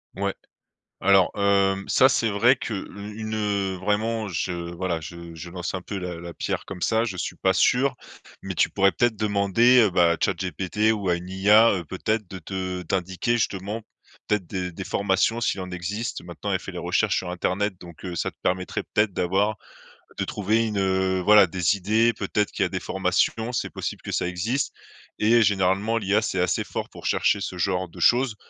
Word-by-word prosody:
Ouais, -, -, -1 dB, 0.7 s
alors, 95 Hz, -1 st, +4 dB
hem, 100 Hz, -1 st, +2 dB
ça, 130 Hz, -, +5 dB
c'est 115 Hz, -4 st, +1 dB
vrai 115 Hz, +6 st, +4 dB
que 115 Hz, -, -5 dB
le 100 Hz, +1 st, -7 dB
une, 110 Hz, -1 st, -4 dB
heu, 100 Hz, -3 st, -1 dB
vraiment 110 Hz, +3 st, -1 dB
je 90 Hz, -1 st, -2 dB, 0.2 s
voilà, 85 Hz, -1 st, -2 dB
je 85 Hz, +1 st, -9 dB
je 85 Hz, +2 st, -8 dB
lance 90 Hz, 0 st, -5 dB
un 95 Hz, -, -3 dB
peu 100 Hz, +3 st, -6 dB
la 90 Hz, -2 st, -5 dB
la 85 Hz, 0 st, -8 dB
pierre -, -, -3 dB
comme 90 Hz, -, -8 dB
ça. 110 Hz, +4 st, +2 dB
Je 105 Hz, -5 st, -4 dB
suis 90 Hz, -, -3 dB
pas 95 Hz, +2 st, +2 dB
sûr, 125 Hz, +7 st, +3 dB, 0.5 s
mais -, -, -5 dB
tu -, -, +3 dB
pourrais 95 Hz, 0 st, +3 dB
peut-être 120 Hz, +1 st, +1 dB
demander, 105 Hz, +4 st, +3 dB
heu, 110 Hz, -, +4 dB
bah, 85 Hz, -2 st, +4 dB
à -, -, -4 dB
chatGPT 95 Hz, +4 st, 0 dB
ou 105 Hz, -3 st, -2 dB
à 85 Hz, -, +3 dB
une 90 Hz, +1 st, -7 dB
IA, 105 Hz, +4 st, +5 dB
heu, 90 Hz, -3 st, -3 dB
peut-être 105 Hz, +6 st, -2 dB
de 95 Hz, -, -7 dB
te 95 Hz, +1 st, -4 dB
t'indiquer 95 Hz, +6 st, -1 dB
justement, 105 Hz, +1 st, -2 dB, 0.4 s
peut-être, 105 Hz, -3 st, 0 dB
des 90 Hz, -1 st, -3 dB
des 95 Hz, +3 st, -7 dB
formations 100 Hz, +4 st, +1 dB
s'il 100 Hz, -4 st, -1 dB
en 90 Hz, 0 st, -7 dB
existe. 105 Hz, +7 st, -4 dB
Maintenant, 85 Hz, -2 st, -5 dB
elle -, -, +1 dB
fait -, -, -8 dB
les -, -, -6 dB
recherches -, -, +1 dB
sur 90 Hz, -, -3 dB
internet, 95 Hz, +3 st, -1 dB
donc, 85 Hz, -2 st, -13 dB
heu, 90 Hz, -2 st, -5 dB
ça -, -, -2 dB
te -, -, -39 dB
permettrait 90 Hz, 0 st, -1 dB
peut-être 105 Hz, -2 st, 0 dB
d'avoir 95 Hz, +5 st, +1 dB, 0.6 s
de -, -, 0 dB
trouver 110 Hz, +3 st, 0 dB
une, 105 Hz, -2 st, -2 dB
heu, 95 Hz, -1 st, +1 dB
voilà, 105 Hz, +1 st, +7 dB
des 90 Hz, +1 st, +1 dB
idées. 110 Hz, +5 st, +2 dB
Peut-être 105 Hz, +1 st, -1 dB
qu'il -, -, -3 dB
y -, -, +2 dB
a -, -, -3 dB
des -, -, -3 dB
formations, 115 Hz, +2 st, 0 dB
c'est 120 Hz, -, -2 dB
possible -, -, -5 dB
que -, -, -6 dB
ça -, -, 0 dB
existe 105 Hz, +10 st, -2 dB, 0.5 s
et 115 Hz, +2 st, +5 dB
généralement 100 Hz, +2 st, +2 dB
l'IA, 105 Hz, 0 st, +1 dB
c'est 95 Hz, -4 st, -1 dB
assez 90 Hz, -1 st, +1 dB
fort -, -, -5 dB
pour -, -, -13 dB
chercher 100 Hz, -, +2 dB
ce 95 Hz, -2 st, -5 dB
genre 95 Hz, 0 st, 0 dB
de 80 Hz, -, -15 dB
choses, 125 Hz, -2 st, +3 dB
95 Hz, 205 wpm, -24 LUFS, 90-110 Hz, 0.7 s, voilà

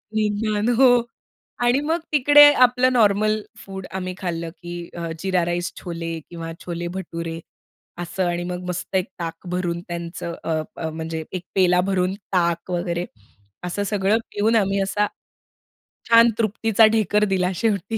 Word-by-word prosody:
निदान 215 Hz, +1 st, 0 dB
हो 260 Hz, +3 st, +6 dB, 0.8 s
आणि 245 Hz, +3 st, +3 dB
मग 325 Hz, +3 st, 0 dB
तिकडे 290 Hz, 0 st, +7 dB, 0.2 s
आपलं 250 Hz, +1 st, +2 dB
नॉर्मल 215 Hz, -1 st, +3 dB, 0.2 s
फूड 190 Hz, -1 st, -7 dB
आम्ही 185 Hz, -1 st, -3 dB
खाल्लं 170 Hz, -2 st, -3 dB
की 175 Hz, -1 st, -7 dB
अ, 170 Hz, -1 st, -4 dB
जीरा 185 Hz, 0 st, +1 dB
राईस 175 Hz, 0 st, -2 dB
छोले 165 Hz, -2 st, -5 dB
किंवा 165 Hz, -1 st, -6 dB
छोले 175 Hz, -1 st, -4 dB
भटुरे, 165 Hz, -3 st, -5 dB, 0.6 s
असं 175 Hz, +2 st, -2 dB
आणि 175 Hz, 0 st, -2 dB
मग 180 Hz, 0 st, -5 dB
मस्त 180 Hz, +2 st, -4 dB
एक 185 Hz, -, +1 dB
ताक 165 Hz, +1 st, -6 dB
भरून 175 Hz, -1 st, -2 dB
त्यांचं 170 Hz, 0 st, -5 dB
अ, 160 Hz, -1 st, 0 dB, 0.2 s
अ, 160 Hz, -, -3 dB
म्हणजे 160 Hz, 0 st, -5 dB
एक 180 Hz, -1 st, -4 dB
पेला 180 Hz, -1 st, +4 dB
भरून 185 Hz, 0 st, +1 dB, 0.2 s
ताक 170 Hz, 0 st, 0 dB
वगैरे 175 Hz, 0 st, -1 dB, 0.6 s
असं 180 Hz, +3 st, -2 dB
सगळं 200 Hz, +1 st, +1 dB
पिऊन 215 Hz, +3 st, +1 dB
आम्ही 195 Hz, -2 st, +2 dB
असा, 205 Hz, +2 st, +1 dB, 1.0 s
छान 230 Hz, 0 st, +7 dB
तृप्तीचा 225 Hz, 0 st, +3 dB
ढेकर 210 Hz, -1 st, +2 dB
दिला 185 Hz, -1 st, +1 dB
शेवटी. 210 Hz, +1 st, -1 dB
185 Hz, 145 wpm, -22 LUFS, 170-210 Hz, 1.0 s, तिकडे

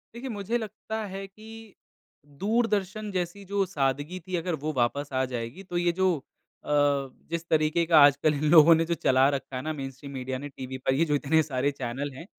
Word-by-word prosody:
देखिए, 250 Hz, +2 st, -6 dB
मुझे 215 Hz, +2 st, -2 dB
लगता 220 Hz, 0 st, -5 dB
है 195 Hz, 0 st, -6 dB
कि, 220 Hz, +1 st, -13 dB, 0.7 s
दूरदर्शन 215 Hz, -1 st, 0 dB
जैसी 185 Hz, +2 st, -3 dB
जो 200 Hz, 0 st, 0 dB
सादगी 145 Hz, +1 st, -2 dB
थी 185 Hz, -, -2 dB
अगर 170 Hz, 0 st, -2 dB
वो 155 Hz, +1 st, -3 dB
वापस 140 Hz, +3 st, 0 dB
आ 130 Hz, 0 st, +1 dB
जाएगी, 120 Hz, +9 st, -5 dB
तो 175 Hz, -2 st, -4 dB
ये 175 Hz, 0 st, +2 dB
जो 185 Hz, -2 st, +4 dB, 0.5 s
अ, -, -, -8 dB, 0.6 s
जिस 170 Hz, 0 st, -3 dB
तरीक़े 155 Hz, +2 st, +2 dB
का 165 Hz, -2 st, +6 dB
आजकल 145 Hz, +1 st, +5 dB
इन 145 Hz, +1 st, -3 dB
लोगों 165 Hz, 0 st, +9 dB
ने 165 Hz, -, +2 dB
जो 170 Hz, -, -1 dB
चला 130 Hz, -3 st, +3 dB
रखा 135 Hz, -2 st, -4 dB
है 130 Hz, -, -3 dB
ना 155 Hz, -, -3 dB
मेनस्ट्रीम 135 Hz, 0 st, -7 dB
मीडिया 130 Hz, -1 st, -4 dB
ने 145 Hz, +1 st, -7 dB
टीवी 130 Hz, -1 st, -7 dB
पर 130 Hz, 0 st, 0 dB
ये 165 Hz, +5 st, +2 dB
जो 150 Hz, -, +1 dB
इतने 150 Hz, +3 st, +2 dB
सारे 140 Hz, -1 st, -1 dB
चैनल 135 Hz, +1 st, -4 dB
हैं 135 Hz, +6 st, -10 dB
160 Hz, 205 wpm, -27 LUFS, 135-190 Hz, 0.7 s, लोगों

